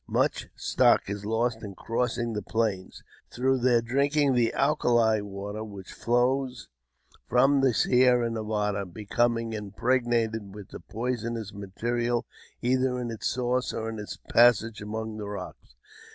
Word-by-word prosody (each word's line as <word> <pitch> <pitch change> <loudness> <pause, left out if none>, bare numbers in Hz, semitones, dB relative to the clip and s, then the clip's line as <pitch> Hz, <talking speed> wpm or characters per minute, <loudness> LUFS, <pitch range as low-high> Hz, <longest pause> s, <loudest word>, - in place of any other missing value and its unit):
Much - - 0
stock - - +3
is 100 0 -5
lost 115 +1 0
in 100 -3 -8
crossing 120 +2 -2
the 105 - -2
Plains, 105 -3 -2 0.3
through 130 +1 +1
their 120 -1 +3
drinking 140 +3 +2
the 120 -2 +2
alkali 120 -6 +3
water 100 +1 -6
which 100 -4 -9
flows 125 +1 0 0.6
from 135 +3 +4
the 135 -1 +4
Sierra 125 +1 +3
Nevada, 105 -2 -1
becoming 115 +4 -1
impregnated 110 -1 -1
with 105 -2 -10
the - - -9
poisonous 115 -2 -4
mineral 120 +4 -2 0.4
either 130 +1 +1
in 120 -1 -3
its 110 - -3
source 125 0 -1
or 110 0 -3
in 110 -1 -6
its 105 - -7
passage 115 -2 +4
among 110 +1 -5
the 105 -1 -5
rocks. 100 -10 -8
115 Hz, 135 wpm, -27 LUFS, 105-125 Hz, 0.6 s, from